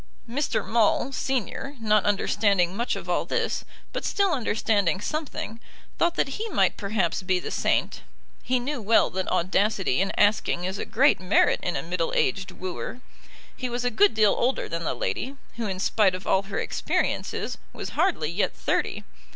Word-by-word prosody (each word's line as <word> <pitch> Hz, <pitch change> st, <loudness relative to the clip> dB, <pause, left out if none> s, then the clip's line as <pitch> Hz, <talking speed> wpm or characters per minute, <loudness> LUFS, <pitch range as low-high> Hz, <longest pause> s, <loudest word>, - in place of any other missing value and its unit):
Mr. 270 Hz, +5 st, -1 dB
Maule, 230 Hz, +3 st, +2 dB
Senior, 270 Hz, +2 st, -2 dB
not 215 Hz, -2 st, +2 dB
understanding 200 Hz, -3 st, +2 dB
much 235 Hz, +3 st, -1 dB
of -, -, -7 dB
all -, -, +1 dB
this, -, -, -1 dB, 0.3 s
but -, -, -3 dB
still 400 Hz, -2 st, +1 dB
understanding 210 Hz, -, +1 dB
something, 280 Hz, -4 st, -4 dB, 0.4 s
thought 340 Hz, 0 st, +2 dB
that -, -, +1 dB
he 450 Hz, +1 st, -3 dB
might -, -, +2 dB
perhaps 200 Hz, -4 st, -1 dB
be 185 Hz, 0 st, +1 dB
the -, -, -6 dB
saint. -, -, 0 dB, 0.4 s
He 255 Hz, +1 st, +1 dB
knew 265 Hz, +1 st, -3 dB
well 220 Hz, +2 st, +4 dB
that 190 Hz, 0 st, -2 dB
audacity 185 Hz, -, +1 dB
in 195 Hz, -, 0 dB
asking 205 Hz, -4 st, +2 dB
is 190 Hz, +2 st, -3 dB
a -, -, -3 dB
great 275 Hz, +6 st, +3 dB
merit 185 Hz, +2 st, +3 dB
in 175 Hz, -, -2 dB
a -, -, -2 dB
middle 170 Hz, 0 st, -2 dB
aged 190 Hz, +8 st, +1 dB
wooer. 185 Hz, +6 st, -6 dB, 0.5 s
He 255 Hz, -, -3 dB
was 245 Hz, +1 st, -2 dB
a 245 Hz, -, +2 dB
good 215 Hz, +1 st, +4 dB
deal 215 Hz, -2 st, +5 dB
older 255 Hz, +2 st, 0 dB
than 165 Hz, 0 st, -4 dB
the -, -, -1 dB
lady, 120 Hz, -, -3 dB, 0.2 s
who, 230 Hz, -2 st, -2 dB
in 190 Hz, -2 st, -3 dB
spite 195 Hz, -1 st, +3 dB
of 185 Hz, -, -8 dB
all 190 Hz, -, +3 dB
her 200 Hz, 0 st, -6 dB
experiences, -, -, -1 dB
was -, -, -6 dB
hardly 320 Hz, -, +1 dB
yet 185 Hz, +5 st, 0 dB
thirty. -, -, -1 dB
210 Hz, 175 wpm, -26 LUFS, 185-245 Hz, 0.5 s, deal